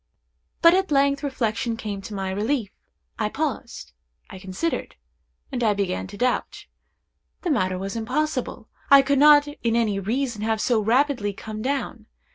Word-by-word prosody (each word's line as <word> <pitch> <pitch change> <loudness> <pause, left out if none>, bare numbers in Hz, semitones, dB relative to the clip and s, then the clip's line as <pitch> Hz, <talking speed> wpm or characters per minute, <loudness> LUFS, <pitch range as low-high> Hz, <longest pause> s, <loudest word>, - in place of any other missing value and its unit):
But 335 0 +8
at 380 +1 +1
length 280 0 +3
reflection 230 -4 -2
came 205 -4 -5
to 210 +1 -8
my 190 -1 -3
relief. 215 +2 -1 0.5
I - - 0
paused; - - -4 0.4
I 190 - -9
considered; 190 - -3 0.6
and 250 -2 -2
I 210 -2 +3
began 195 -2 -2
to 200 +2 -10
doubt. 250 +2 -1 0.8
The 350 - 0
matter 185 -9 +1
was 195 +2 -5
impossible. 255 0 -2 0.2
I 275 -1 +8
could 280 0 +1
not 295 0 +7
in 235 -6 -2
any 215 -4 +1
reason 235 +2 -2
have 220 0 0
so 230 -1 +2
rapidly 235 -2 +1
come 215 +2 -7
down. 255 -4 -3
230 Hz, 155 wpm, -24 LUFS, 205-280 Hz, 0.8 s, But